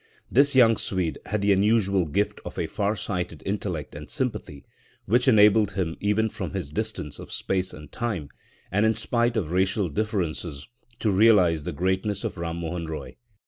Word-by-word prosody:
This 140 +2 +4
young 115 -4 +6
Swede 90 -4 -2
had 105 -1 -1
the 100 - +4
unusual 100 -2 +2
gift 100 +7 -1
of - - -8
a - - 0
far 105 +1 -1
sighted 90 -6 -4
intellect 95 -6 -3
and - - -9
sympathy, 70 -1 -4 0.4
which 120 +5 +2
enabled 105 -3 +5
him 90 -4 -2
even 105 +2 +1
from - - -5
his 70 - -4
distance 105 -6 -4
of - - -10
space 95 -1 -1
and 75 -2 -11
time, 105 - -3 0.4
and 105 +3 +2
in 110 0 +3
spite 120 +1 0
of 85 -7 -2
racial 95 +1 +1
differences, 85 -6 -3 0.3
to 110 - +2
realise 95 -6 +5
the 80 - -4
greatness 95 +5 -1
of - - -4
Ram 85 0 -3
Mohan 85 0 -4
Roy. 80 -1 -6
100 Hz, 175 wpm, -25 LUFS, 85-110 Hz, 0.4 s, young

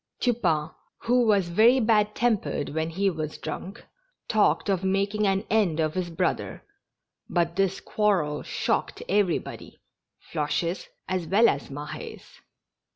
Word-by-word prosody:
Tupain, 170 - +1 0.3
who 245 0 +2
was 200 -5 +3
very 225 +9 +5
bad 215 -2 +2
tempered 210 -12 0
when 160 +2 -2
he 195 +4 0
was 155 -2 -5
drunk, 195 - -7 0.4
talked 215 -1 +2
of 195 -2 0
making 200 +2 +1
an 195 +2 +1
end 200 -8 +2
of 155 -1 +1
his 185 -2 -2
brother, 165 - -2 0.7
but 170 -1 0
this 195 0 +1
quarrel 185 -9 0
shocked - - -2
everybody 195 -3 -1 0.3
— - - -59
Floches 170 +3 -1 0.2
as 185 -3 -2
well 215 +6 +5
as 140 -7 -1
Mah^s. 145 +2 -7
190 Hz, 135 wpm, -26 LUFS, 160-210 Hz, 0.7 s, very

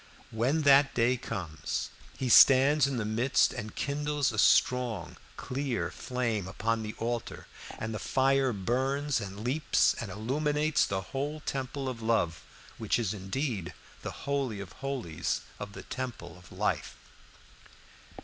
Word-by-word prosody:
When 130 +8 +1
that 140 0 +5
day 120 +2 +3
comes 90 -10 -4 0.3
he 130 - -2
stands 135 +4 +7
in 135 -2 -2
the 110 - -1
midst 115 +5 +2
and 105 0 -6
kindles 145 -1 0
a 110 - -3
strong 120 -9 +3 0.2
clear 130 -2 -2
flame 115 -6 -2
upon 115 +4 -1
the 110 0 -5
altar, 120 +1 -3 0.3
and 110 0 -4
the 105 - -4
fire 135 +3 +2
burns 130 +7 0
and 100 +1 -7
leaps 135 +6 +2
and 115 - -5
illuminates 150 +9 +1
the 95 -1 -1
whole 145 +3 -2
temple 135 0 -3
of 125 -3 -4
love, 110 -8 +1 0.4
which 110 -2 +1
is 110 -5 -1
indeed 95 - -3 0.3
the - - -7
holy 135 -7 -1
of 95 -4 -8
holies 85 - -3 0.2
of 100 0 -7
the - - -9
temple 125 -10 -6
of 90 -1 -16
life. - - -1
125 Hz, 140 wpm, -30 LUFS, 105-135 Hz, 0.4 s, stands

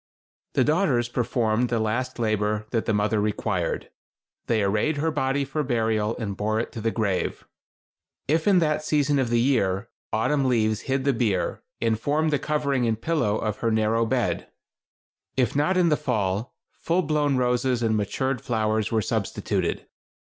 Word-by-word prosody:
The - - +4
daughters 150 -7 +2
performed 120 -1 0
the 120 - +1
last 120 +4 -1
labor 110 -2 0
that 115 -2 0
the - - +2
mother 105 +1 +1
required. 105 -4 -2 0.6
They 110 -3 +2
arrayed 105 +10 +1
her 160 +3 0
body 135 -1 0
for 145 +3 -2
burial 110 -4 0
and 105 -5 -4
bore 110 +2 0
it 115 - -3
to 115 - -6
the 115 - +1
grave. 105 -5 -1 0.8
If 160 +5 +1
in 200 -2 +5
that 155 -3 +1
season 145 -2 +2
of 130 -3 0
the 120 0 +2
year, 115 -5 +1 0.2
autumn 135 +6 +1
leaves 110 -4 +1
hid 135 0 +1
the 140 - +3
bier, 110 -7 0 0.2
and 110 -1 +1
formed 150 +4 +1
the 145 - +2
covering 140 -5 0
and 110 -1 0
pillow 115 -8 0
of 105 -2 -2
her 115 - 0
narrow 110 +1 +2
bed. - - -1 0.9
If 125 -1 +1
not 150 +6 +2
in 175 -2 +4
the 150 - +4
fall, 110 -6 -1 0.2
full 175 +2 0
blown 145 -3 +1
roses 125 0 +1
and 110 -1 +2
matured 130 +5 -1
flowers 110 -2 0
were 110 -2 +1
substituted. - - -2
120 Hz, 170 wpm, -25 LUFS, 110-140 Hz, 0.9 s, in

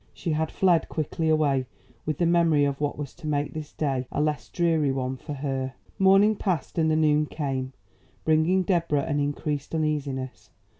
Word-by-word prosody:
She 165 - -3
had 155 +1 0
fled 175 -4 +2
quickly 160 +1 -2
away 140 -5 +2 0.4
with 155 -2 -1
the 175 - +1
memory 165 -4 +4
of 140 0 -2
what 145 -1 -1
was 145 -2 -6
to 170 -3 -9
make 145 -1 -1
this 155 -1 -6
day 135 -4 -2
a - - -2
less 150 -1 -1
dreary 165 -5 +1
one 130 -1 -2
for 145 +3 -7
her. 135 -2 -3 0.2
Morning 195 +3 +5
passed 175 -5 -2
and 160 -1 +3
the 155 - +2
noon 150 -1 +3
came, 135 -4 -3 0.5
bringing 160 +4 +3
Deborah 170 -6 +1
an 145 0 -1
increased 145 +1 -2
uneasiness. 135 -7 -2
150 Hz, 180 wpm, -26 LUFS, 140-160 Hz, 0.5 s, Morning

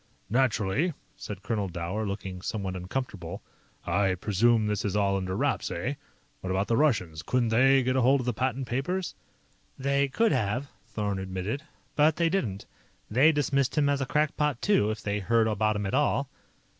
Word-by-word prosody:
"Naturally," 125 - +1 0.2
said 100 -2 -8
Colonel 105 -4 -1
Dower, 90 +5 -3
looking 95 -2 -5
somewhat 95 -2 -3
uncomfortable. 95 -2 -5 0.4
"I 95 -2 +1
presume 110 +4 +2
this 105 -1 -1
is 100 -1 -1
all 100 -1 +2
under 95 -1 -2
wraps, - - 0
eh? 100 +11 -2 0.5
What 95 - -6
about 95 +2 +1
the 115 - +2
Russians? 110 - +1
Couldn't 120 +3 0
they 135 +4 +5
get 130 +1 0
hold 130 +1 +4
of - - -6
the 125 - 0
patent 130 +3 -1
papers?" 170 +10 -2 0.6
"They 140 +1 +1
could 225 - +2
have," 110 +6 0 0.2
Thorn 100 -3 -2
admitted, 95 +7 -3 0.3
"but 155 +1 +4
they 170 -1 +2
didn't. 115 - -2 0.5
They 135 +8 +6
dismissed 140 -1 0
him 145 -1 +3
as 140 -1 +1
a 135 - -1
crackpot, 150 -2 +1
too, 195 - +2
if 110 0 -4
they 100 0 -1
heard 115 +3 +2
about 110 0 +1
him 105 0 -2
at 95 - -3
all. 140 -1 +1
115 Hz, 175 wpm, -28 LUFS, 100-135 Hz, 0.6 s, They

